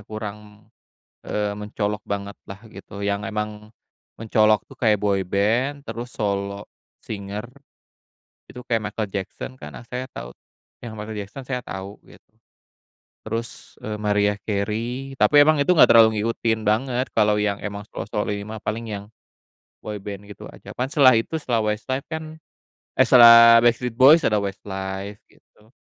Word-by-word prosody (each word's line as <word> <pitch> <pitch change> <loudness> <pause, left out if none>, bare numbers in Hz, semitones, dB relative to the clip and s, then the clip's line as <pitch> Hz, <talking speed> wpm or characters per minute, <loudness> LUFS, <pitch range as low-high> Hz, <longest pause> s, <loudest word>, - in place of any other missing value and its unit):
kurang, 105 -1 -8 0.6
eee, 105 -1 -2
mencolok 105 0 -3
banget 100 0 -4
lah 95 0 -9
gitu 100 +1 -10
yang 100 0 -1
emang, 105 0 -5 0.5
mencolok 110 -1 +2
tuh - - -16
kayak 110 -3 +3
boyband 105 +8 0
terus 115 0 -6
solo 100 -1 -3 0.4
singer, 100 0 -6 1.0
itu 125 - -10
kayak 115 -1 0
Michael 105 -1 -4
Jackson 100 +5 -5
karena 75 +7 -9
saya 125 +1 -4
tahu, - - -9 0.5
yang 115 -2 -8
Michael 105 0 -6
Jackson 105 +7 -9
saya 125 -1 -3
tahu 95 -3 -8
gitu. - - -16 1.1
Terus, 115 +1 -6
eee, 105 0 -5
Mariah 105 -1 +1
Carey 115 +6 -3
tapi 145 -1 +6
emang 155 -1 +3
itu 140 - +1
nggak - - +7
terlalu 115 -1 +8
ngikutin 110 0 -1
banget 125 +4 0
kalau 105 0 +3
yang 105 -1 -1
emang 100 0 -6
solo-solo 105 +2 -3
ini 100 0 -5
mah 110 0 -7
paling 115 +2 -3
yang, 100 -1 -5 0.8
boyband 105 -1 -7
gitu 100 0 -11
aja - - -12
kan 125 +1 -3
setelah 140 -3 +6
itu 115 +7 0
setelah 125 -7 -1
Westlife 130 +6 -3
kan, 160 0 -7 0.5
eh, - - +4
setelah 115 -1 +9
Backstreet 120 0 +1
Boys 140 +6 +7
ada 105 - +2
Westlife 95 0 -5
gitu, 110 +2 -27
105 Hz, 145 wpm, -23 LUFS, 100-120 Hz, 1.1 s, setelah